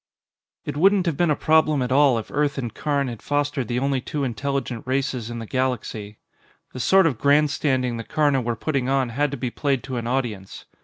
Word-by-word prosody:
It - - -4
wouldn't 190 +4 +4
have 165 -4 0
been 175 +2 +1
a 150 - +3
problem 155 -3 +3
at 125 - -3
all 135 -2 +4
if 110 - -6
Earth 145 -1 0
and 120 -5 -4
Karn 145 -2 -1
had 115 -3 -6
fostered 145 -3 -1
the 120 - -2
only 135 0 0
two 145 +3 -3
intelligent 125 0 -3
races 130 -3 -1
in 120 - -5
the 115 - -6
galaxy. 110 -4 -3 0.6
The 130 - -6
sort 190 +10 +4
of 135 -9 0
grandstanding 140 -3 +2
the 115 - -5
Karna 145 0 +1
were 120 -1 -2
putting 135 +1 -1
on 135 -2 +1
had 145 +5 0
to 140 - -5
be 125 -1 -3
played 135 -3 -1
to 130 -2 -4
an 115 -1 -3
audience. 120 -7 -3
135 Hz, 210 wpm, -23 LUFS, 120-145 Hz, 0.6 s, wouldn't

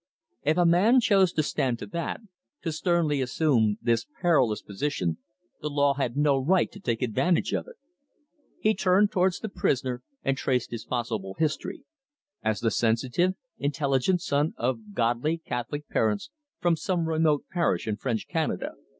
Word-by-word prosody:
If 155 +3 +1
a 175 - +4
man 195 +10 +5
chose 195 -6 +4
to 155 - +1
stand 125 -4 0
to - - -7
that, 170 +1 -4 0.4
to 165 - -1
sternly 160 -3 +1
assume 125 -5 +2
this 115 -1 +1
perilous 130 - +2
position, 100 - -2 0.4
the 150 - -2
law 145 -1 +3
had 135 -2 -2
no 145 -2 +3
right 175 +8 +2
to 200 - -11
take 120 - -1
advantage 160 +9 +1
of - - -1
it. - - -12 0.8
He 215 - +3
turned 200 +1 +3
towards 185 0 +2
the 220 - -4
prisoner 130 - -1 0.2
and 135 - +1
traced 125 -2 -1
his 115 -1 -5
possible 110 -6 -3
history: 160 - -2 0.6
as 110 -1 0
the 115 - +1
sensitive, 125 - +1 0.2
intelligent 145 +4 +1
son 145 +2 0
of 115 -4 -3
godly 120 +7 +1
Catholic 145 0 -5
parents 110 - 0 0.3
from 175 -1 +2
some 170 0 -1
remote 155 -2 +2
parish 170 - +1
in 105 -1 -1
French 115 -1 -2
Canada. - - -1
145 Hz, 160 wpm, -27 LUFS, 120-170 Hz, 0.8 s, man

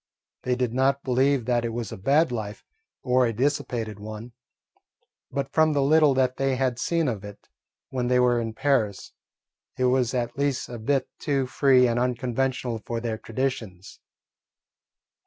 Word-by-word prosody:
They 125 0 0
did 125 -2 -1
not 135 +2 +1
believe 130 0 +2
that 120 -1 +1
it 115 -1 -3
was 115 -3 -4
a - - -5
bad 145 - +2
life 110 -2 -5 0.4
or 125 0 +3
a - - -1
dissipated 115 -4 -2
one, 110 +3 -8 1.0
but 135 0 -4
from 155 -1 +4
the 145 - +2
little 150 -1 +4
that 130 -1 +1
they 135 -1 +1
had 130 -2 -1
seen 165 +1 0
of 110 -6 -3
it 105 0 -11 0.4
when 125 -2 -1
they 125 0 +3
were 120 -1 +3
in 115 -1 -4
Paris, 115 -9 0 0.6
it 130 - +1
was 125 -1 +2
at 120 +1 -2
least 140 -2 -1
a 120 -1 -7
bit 130 +3 0
too 140 -2 0
free 130 -1 +4
and 120 0 0
unconventional 125 -1 -1
for 115 -1 -3
their 115 -2 -3
traditions. 115 -7 -4
125 Hz, 165 wpm, -25 LUFS, 115-135 Hz, 1.0 s, from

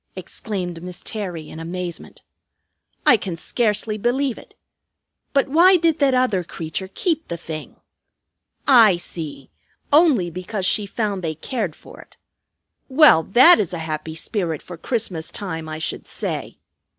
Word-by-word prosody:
exclaimed 180 -6 -5
Miss 180 0 -8
Terry 180 -8 -5
in 160 - -9
amazement. 175 +1 -6 0.8
"I 245 - +7
can 190 -4 -5
scarcely 215 +3 -1
believe 250 +3 0
it. - - -17 0.8
But 275 -1 +2
why 350 +6 +6
did 330 -2 +1
that 275 -3 +3
other 250 -8 +2
creature 170 +3 -5
keep 325 - -1
the 170 - -4
thing? 160 -2 -8 0.9
I 230 -9 +7
see! 155 -6 -6 0.4
Only 285 - +4
because 185 +3 -4
she 205 +1 +2
found 205 -2 -2
they 160 -1 -2
cared 200 - -3
for - - -14
it. - - -20 0.7
Well, 265 - +7
that 255 - +6
is 190 -4 -1
a - - -2
happy 155 0 -4
spirit 165 -3 -3
for 180 - -9
Christmas 180 -4 -2
time, 165 -6 -5
I 155 - -5
should 155 - -4
say! - - -4
195 Hz, 145 wpm, -21 LUFS, 165-245 Hz, 0.9 s, I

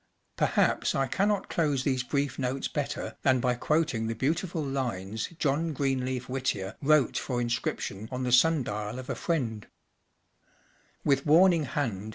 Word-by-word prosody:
Perhaps - - +2
I 135 - +2
cannot 200 +7 0
close 145 -5 0
these 130 -2 +1
brief 140 +1 -2
notes 130 +1 -1
better - - -4
than 130 -1 +3
by 125 0 +1
quoting 130 -3 0
the 115 - -2
beautiful 160 - -1
lines 115 -7 -3
John 155 +2 0
Greenleaf 130 -2 -1
Whittier 125 -7 -2
wrote 150 -3 +3
for 125 - -3
inscrip¬ 120 0 -1
tion 100 +3 -5
on 130 0 -3
the 125 - -1
sun 150 +3 +5
dial 105 +1 -4
of 130 0 -5
a - - -2
friend: 125 - -2
H - - -36 1.3
With 140 0 +2
warning 165 -2 +5
band 110 -8 -2
130 Hz, 160 wpm, -28 LUFS, 120-150 Hz, 1.3 s, sun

